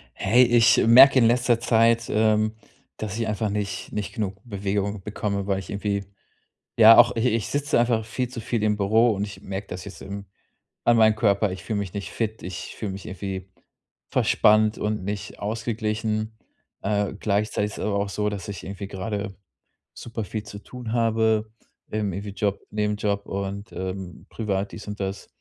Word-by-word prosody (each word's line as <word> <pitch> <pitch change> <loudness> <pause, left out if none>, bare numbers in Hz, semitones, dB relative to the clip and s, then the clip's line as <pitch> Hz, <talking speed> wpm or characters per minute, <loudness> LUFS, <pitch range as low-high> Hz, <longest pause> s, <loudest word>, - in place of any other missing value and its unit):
Hey, 120 +6 +4
ich 120 -2 +5
merke 130 +3 +9
in 120 - +5
letzter 120 0 +3
Zeit, 115 0 +3
ähm, 110 0 +2 0.4
dass 110 -1 -4
ich 115 - -1
einfach 105 0 -1
nicht 100 -1 -3
nicht 105 -1 -4
genug 105 -5 -2
Bewegung 100 -2 -2
bekomme, 100 -1 -2
weil 95 -1 +1
ich 95 - -9
irgendwie, 100 0 -2 0.7
ja, 115 0 +9
auch, 120 0 +6
i - - 0
ich 115 -3 0
sitze 145 -2 0
einfach 115 -2 +1
viel 125 +3 -3
zu 120 -1 -7
viel 115 0 -2
im 105 -1 +2
Büro 110 +4 +3
und 100 0 -1
ich 100 -2 -10
merke 95 +1 -5
das 90 - -6
jetzt 100 - -10
im 100 0 -7 0.6
an 120 - +5
meinem 110 -1 +5
Körper. 105 -2 +2
Ich 95 0 -8
fühle 110 - -2
mich 95 -3 -5
nicht 100 -1 -5
fit, 110 -1 -3
ich 90 +1 -7
fühle 105 -4 -4
mich 95 0 -8
irgendwie 95 0 -6 0.6
verspannt 110 0 +3
und 105 -2 -2
nicht 100 0 -5
ausgeglichen. 110 0 -2 0.4
Äh, 100 -1 0
gleichzeitig 105 0 0
ist - - -9
es - - -3
aber 105 -1 0
auch 100 0 -1
so, 105 +1 -1
dass 100 -1 -6
ich 100 - -6
irgendwie 100 +1 -6
gerade 100 +1 -4 0.6
super 115 -1 -6
viel 105 +2 -5
zu 100 0 -9
tun 120 +1 -7
habe, 110 -2 +2 0.4
im 105 -3 -2
irgendwie 100 +2 -5
Job, 100 0 -1
Nebenjob 105 -1 -1
und, 100 +1 -4
ähm, 95 -2 -6
privat 100 -3 -2
dies 105 - -9
und 105 0 -6
das, 95 0 -4
105 Hz, 180 wpm, -24 LUFS, 100-110 Hz, 0.7 s, merke